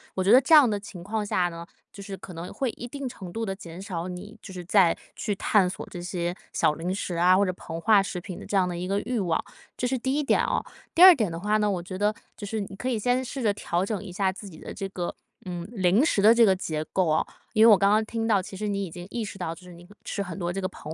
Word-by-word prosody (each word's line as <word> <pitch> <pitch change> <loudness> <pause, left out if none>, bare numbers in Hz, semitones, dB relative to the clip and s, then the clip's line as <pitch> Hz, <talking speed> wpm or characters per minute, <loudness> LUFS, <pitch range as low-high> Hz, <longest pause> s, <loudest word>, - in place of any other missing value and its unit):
我 185 - 0
觉 195 - +3
得 250 - +9
这 295 +5 +5
样 290 -6 +8
的 205 -1 -1
情 190 -3 -10
况 210 +2 -2
下 180 -3 +1
呢， 170 0 -8 0.3
就 200 - -11
是 195 0 -6
可 190 - -11
能 170 +2 -7
会 265 - -1
一 240 - -8
定 280 +2 -5
程 185 -7 -9
度 225 0 -2
地 195 - -2
减 180 -2 -10
少 180 -4 -4
你， 190 +4 -8
就 190 - -10
是 180 -1 -7
再 180 -1 +4 0.2
去 210 -2 -2
探 195 -1 +3
索 190 - -6
这 175 - -7
些 175 -1 -2 0.2
小 150 - +2
零 170 +4 -3
食 185 -3 -3
啊， 180 +2 +5
或 200 - +3
者 185 - 0
膨 165 -2 -7
化 210 +3 +5
食 180 -2 -4
品 180 0 -8
的 - - -9
这 - - -3
样 185 -2 +3
的 175 - -4
一 180 +1 -4
个 200 +1 0
欲 245 0 -2
望， 175 -5 0 0.3
这 - - -2
是 260 +1 0
第 260 +2 -1
一 300 - +1
点 275 - +3
哦。 - - -1 0.3
第 340 - +2
二 375 0 +12
点 225 - 0
的 165 - -5
话 210 +3 +1
呢， 210 -1 +1
我 180 -3 -2
觉 185 +1 -7
得 205 +2 +2 0.2
就 205 - -7
是 220 0 -2
你 195 -1 -7
可 245 - -4
以 250 -3 0
先 245 +4 +1
试 260 +2 -5
着 210 -2 +3
调 180 -2 -1
整 210 -1 -3
一 195 - -8
下 190 +1 0
自 200 +2 -10
己 160 - -13
的 - - -8
这 195 - -4
个 180 -2 -4 0.3
嗯， 175 -1 -5
零 195 - +3
食 210 - +2
的 215 +3 +7
这 235 0 +6
个 190 -3 +4
结 155 -4 -3
构 185 -2 +2
哦。 155 - +2 0.3
因 220 0 +6
为 230 - +9
我 205 - +8
刚 200 +1 +3
刚 215 +1 +4
听 225 0 -3
到 205 -4 +3
其 190 - -9
实 210 +2 -3
你 200 -1 -1
已 175 - -9
经 175 +1 -8
意 230 +1 -3
识 200 - -8
到， 175 -3 -3
就 165 - -16
是 180 -1 -13
你 175 +1 -14
可 205 +3 -18
吃 200 - -3
很 180 -4 -7
多 175 -1 -2
这 195 - -3
个 185 - -2
膨 155 -4 -9
195 Hz, 330 characters per minute, -26 LUFS, 180-215 Hz, 0.3 s, 二